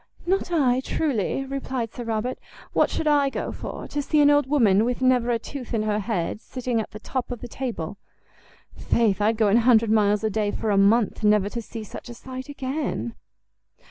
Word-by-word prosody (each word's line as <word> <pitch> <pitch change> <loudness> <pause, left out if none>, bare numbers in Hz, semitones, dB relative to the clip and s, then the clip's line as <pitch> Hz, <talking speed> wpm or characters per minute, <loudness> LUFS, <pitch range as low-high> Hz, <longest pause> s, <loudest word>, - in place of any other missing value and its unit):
"Not 375 0 0
I, 260 -7 +3
truly," 270 - -1
replied 265 -4 -4
Sir 245 - -6
Robert; 230 +3 -2 0.3
"what - - +3
should - - -2
I 290 -2 +3
go - - -4
for? - - -7
to 290 - -2
see 300 +2 +1
an 290 0 +6
old 290 -2 +3
woman 220 -8 +4
with 245 +1 -1
never 255 -2 +3
a 235 - +2
tooth 245 +1 -6
in 215 - 0
her 210 -1 0
head 210 -1 -2
sitting 245 -3 -2
at - - -7
the - - -9
top 255 +3 -4
of 245 - -5
the 245 - -7
table! 220 -7 -5 0.8
Faith, 215 -4 +1
I'd 220 +2 +2
go 215 -1 +3
an 205 - +5
hundred 230 -2 +4
miles 210 -1 +3
a 220 - +1
day 210 0 0
for 215 +1 -2
a - - +3
month 210 +3 +3
never 210 -1 +4
to 235 +2 -4
see 225 +1 -8
such 215 - -9
a 240 - -8
sight 260 +3 -8
again." 265 - -3
235 Hz, 205 wpm, -24 LUFS, 215-265 Hz, 0.8 s, an